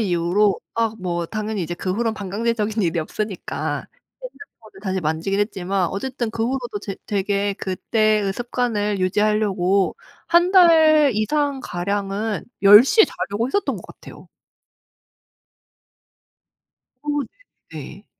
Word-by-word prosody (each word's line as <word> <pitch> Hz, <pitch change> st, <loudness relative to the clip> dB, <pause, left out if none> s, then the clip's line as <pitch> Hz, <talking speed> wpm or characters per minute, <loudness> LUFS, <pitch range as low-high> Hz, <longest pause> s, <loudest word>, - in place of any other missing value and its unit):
이후로 185 Hz, +1 st, +1 dB, 0.2 s
아 230 Hz, -1 st, 0 dB
뭐 175 Hz, -2 st, -3 dB
당연히 215 Hz, 0 st, -3 dB
이제 175 Hz, +1 st, -4 dB
그 185 Hz, +1 st, -3 dB
후론 225 Hz, +1 st, -1 dB
반강제적인 215 Hz, +2 st, -2 dB
일이 170 Hz, -1 st, 0 dB
없으니까 200 Hz, +5 st, -4 dB, 0.4 s
핸드폰을 230 Hz, -, -13 dB
다시 190 Hz, -2 st, -2 dB
만지긴 165 Hz, +6 st, -1 dB
했지만 190 Hz, -3 st, -1 dB
어쨌든 240 Hz, +3 st, -4 dB
그 225 Hz, 0 st, -2 dB
후로도 245 Hz, -4 st, -3 dB
제 195 Hz, -2 st, -6 dB
되게 200 Hz, 0 st, 0 dB
그때의 210 Hz, +1 st, 0 dB
습관을 220 Hz, -3 st, -2 dB
유지하려고 200 Hz, -, +1 dB, 0.3 s
1 345 Hz, +2 st, +4 dB
달 315 Hz, -5 st, +6 dB
이상 280 Hz, +5 st, 0 dB
가량은 200 Hz, +4 st, -3 dB, 0.2 s
10 205 Hz, +4 st, +9 dB
시에 435 Hz, +10 st, +5 dB
자려고 215 Hz, +4 st, -3 dB
했었던 405 Hz, +9 st, -1 dB
것 -, -, -10 dB
같아요. -, -, -14 dB, 2.7 s
어 295 Hz, -, -11 dB
네 275 Hz, -, -4 dB, 0.5 s
네. -, -, -10 dB
210 Hz, 255 characters per minute, -21 LUFS, 195-235 Hz, 2.7 s, 10